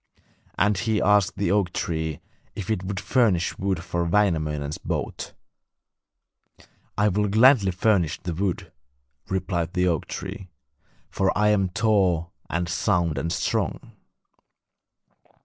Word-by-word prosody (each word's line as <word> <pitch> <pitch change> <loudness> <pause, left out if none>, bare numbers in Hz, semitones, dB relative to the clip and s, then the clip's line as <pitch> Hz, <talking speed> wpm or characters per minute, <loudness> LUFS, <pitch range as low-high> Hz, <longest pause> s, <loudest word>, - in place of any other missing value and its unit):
And 105 -1 +2
he 110 -2 0
asked 105 0 +3
the 100 -2 0
oak 100 -4 +1
tree 80 -1 -3 0.3
if 100 0 -4
it 95 -4 -1
would 95 0 -3
furnish 105 -8 +1
wood 95 -3 -1
for 85 0 -2
Wainamoinen's 80 -6 0
boat. - - -4 1.6
'I 105 +1 +3
will 105 +2 +1
gladly 110 0 +5
furnish 90 -3 +1
the 90 - -4
wood,' 90 +1 -2 0.6
replied 90 -3 -2
the 90 0 +1
oak 85 -4 0
tree, 95 -2 -7 0.6
'for 95 -1 +1
I 105 +1 +3
am 100 -3 +2
tall 90 -5 +1 0.2
and 85 +1 -1
sound 85 -4 0
and 85 +3 -2
strong. - - -2
95 Hz, 125 wpm, -24 LUFS, 85-105 Hz, 1.6 s, gladly